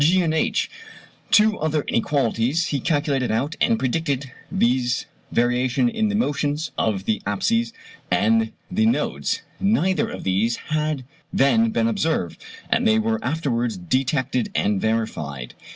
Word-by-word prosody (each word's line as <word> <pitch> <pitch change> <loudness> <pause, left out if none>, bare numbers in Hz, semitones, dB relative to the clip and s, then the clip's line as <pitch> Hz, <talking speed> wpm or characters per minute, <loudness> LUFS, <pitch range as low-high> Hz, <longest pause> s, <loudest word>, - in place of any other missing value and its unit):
(g) 175 +5 +4
and 160 -2 0
(h) 160 - +1 0.6
Two 215 0 +4
other 155 -2 0
inequalities 135 +4 +1
he 140 - 0
calculated 145 -2 0
out 135 +9 -1
and 230 - +3
predicted, 140 - -1 0.2
viz. 125 0 +1 0.3
variation 125 - +2
in 225 -2 0
the 210 - -1
motions 150 - -1
of 100 -3 -1
the 110 - 0
apses 230 - +1 0.4
and 110 +5 +2 0.2
the 220 +4 +2
nodes. 230 - 0 0.2
Neither 195 +1 +2
of - - -7
these 100 +5 +1 0.2
had 155 -3 0 0.3
then 225 +12 +3
been 225 0 +1
observed, 160 - -1 0.3
but - - +3
they 110 - +4
were 110 0 0
afterwards 125 - -1
detected 130 - 0
and 100 -1 +1
verified. 80 - -2
135 Hz, 135 wpm, -23 LUFS, 115-165 Hz, 0.6 s, g